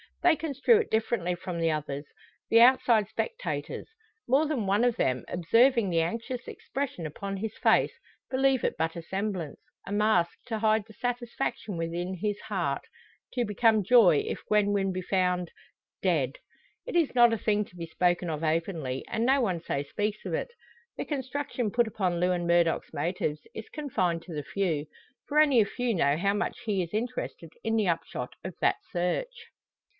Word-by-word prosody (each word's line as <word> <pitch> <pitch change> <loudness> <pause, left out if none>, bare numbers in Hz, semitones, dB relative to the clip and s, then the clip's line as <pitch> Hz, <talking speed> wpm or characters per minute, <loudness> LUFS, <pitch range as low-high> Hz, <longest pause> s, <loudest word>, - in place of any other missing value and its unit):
They 350 -2 +6
construe 310 - +3
it 435 - -1
differently 220 -5 0
from 175 -1 -5
the 165 0 +2
others 145 -1 -3 0.4
the 230 - +6
outside 235 -4 +5
spectators. 480 - -4 0.4
More 280 +5 +3
than 270 -9 -1
one 200 +4 +2
of 245 -2 +3
them, 130 -1 0
observing 230 +5 +3
the 165 -2 +2
anxious 230 +9 -3
expression 265 - -4
upon 195 +6 -5
his 215 +2 -4
face, - - +3 0.4
believe 265 -1 +2
it - - 0
but 160 +1 -1
a 170 - -6
semblance 190 -4 -3 0.3
a - - -7
mask 205 -5 +2
to 225 -3 -2
hide 215 -1 +2
the 220 - -14
satisfaction 240 -5 -3
within 170 +3 -3
his 205 +2 -2
heart - - -2 0.5
to 245 -2 0
become 215 0 +3
joy 195 -8 +6
if - - -4
Gwen 210 -1 +3
Wynn 195 -1 +1
be 185 0 -3
found 180 -2 0 0.5
dead. 150 -9 +1 0.5
It - - -4
is 335 -4 +3
not 240 -2 +6
a - - +1
thing 210 0 +1
to 180 - -20
be 170 -1 -6
spoken 175 +1 +1
of 155 0 -3
openly, 155 -5 -1
and 225 - -1
no 270 +2 +4
one 185 -8 0
so 140 -4 -2
speaks 210 +8 -3
of - - -3
it. - - -1 0.5
The - - -3
construction 265 -4 -2
put 240 +1 +2
upon 185 -5 -1
Lewin 180 -1 +1
Murdock's 170 -1 +2
motives 155 -1 -2
is 220 - -8
confined 185 - -1
to 175 - -9
the 150 -1 -3
few; 160 -6 -1 0.4
for 300 +1 +2
only 285 -5 +6
a - - +3
few 245 +3 -1
know 145 -5 +2
how 200 +4 +1
much 205 - -2
he 205 -4 +1
is 170 - -8
interested 220 -7 -4
in 225 0 0
the 215 -3 +2
upshot 165 -7 -2
of 185 -1 -6
that - - +3
search. 325 - -2
200 Hz, 180 wpm, -28 LUFS, 170-240 Hz, 0.5 s, They